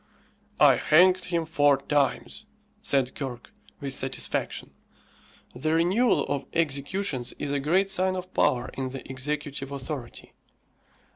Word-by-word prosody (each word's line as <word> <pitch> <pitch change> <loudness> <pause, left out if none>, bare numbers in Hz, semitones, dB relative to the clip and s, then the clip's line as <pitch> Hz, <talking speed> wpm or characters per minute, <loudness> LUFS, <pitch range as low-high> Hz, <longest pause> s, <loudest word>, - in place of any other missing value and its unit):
"I - - +7
hanged 180 +3 +4
him 170 -2 -1
four 145 -3 +3
times," 140 0 -1 0.3
said 135 -2 0
Kirke, 125 -4 -7 0.3
with 140 -1 -3
satisfaction. 135 0 -2 0.8
The 155 +6 -1
renewal 190 +9 +3
of 140 - -3
executions 145 -2 -1
is 140 - -5
a 140 - 0
great 185 +8 +1
sign 185 0 +1
of 185 0 -7
power 125 -1 +1
in 130 -1 -3
the 135 +1 -8
executive 140 +1 -3
authority. 140 -2 -6
145 Hz, 125 wpm, -26 LUFS, 135-170 Hz, 0.8 s, I